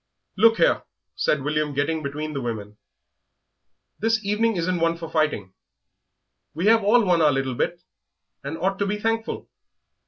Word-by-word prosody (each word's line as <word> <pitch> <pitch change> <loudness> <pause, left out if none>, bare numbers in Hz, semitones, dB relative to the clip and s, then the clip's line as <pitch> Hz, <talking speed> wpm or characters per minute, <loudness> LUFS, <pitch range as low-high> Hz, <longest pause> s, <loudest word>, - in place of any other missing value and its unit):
"Look 225 +3 +5
here," - - +3 0.3
said 145 -3 0
William, 150 0 -1
getting 155 +3 0
between 150 +2 -4
the 140 - -3
women; 105 -3 -5 1.2
"this 220 0 +1
evening 215 +2 +1
isn't 175 +1 0
one 165 0 +1
for 165 -1 -6
fighting; 150 - 0 1.0
we 170 +4 -2
have 225 0 +5
all 225 +3 +4
won 175 -3 +3
our 150 -2 +5
little 135 -1 -1
bit, 175 +8 -2 0.6
and 140 +4 -5
ought 195 +2 -1
to 200 - 0
be 210 +1 -1
thankful. 225 +1 -2
165 Hz, 155 wpm, -24 LUFS, 145-210 Hz, 1.2 s, Look